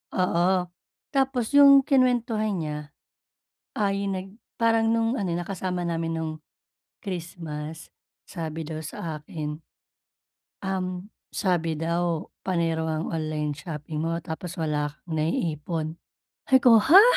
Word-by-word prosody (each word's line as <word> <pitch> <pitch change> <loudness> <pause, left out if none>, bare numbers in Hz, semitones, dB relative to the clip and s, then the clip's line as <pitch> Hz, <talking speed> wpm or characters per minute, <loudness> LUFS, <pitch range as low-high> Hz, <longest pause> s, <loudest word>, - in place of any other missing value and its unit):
oo. 180 -1 +2 0.6
Tapos 270 -4 +1
'yung 280 -1 +8
kinwentuhan 240 -6 +2
niya 150 -1 -3 1.0
ay 200 -1 +1
nag 190 0 -4 0.2
parang 225 -1 +3
nung 230 +1 +2
ano, 190 -3 -1
nakasama 180 0 -2
namin 165 -1 -1
nung 160 -1 -2 0.7
Christmas, 165 -4 -6 0.4
sabi 160 -3 -4
daw 155 0 -5
sa 160 0 -5
akin, 150 0 -5 1.1
um, 185 0 -2 0.3
sabi 175 -5 +1
daw, 170 0 0 0.2
panay 170 -3 +1
raw 160 -1 -1
ang - - -3
online 155 -2 -1
shopping 150 -1 -5
mo 165 +1 0
tapos 170 +2 -6
wala 150 -2 0
kang 160 +1 -7
na-iipon. 160 0 -1 0.5
Sabi 265 - +6
ko, 235 -2 +8
"Ha?" 335 - +9
170 Hz, 120 wpm, -26 LUFS, 160-200 Hz, 1.1 s, Ha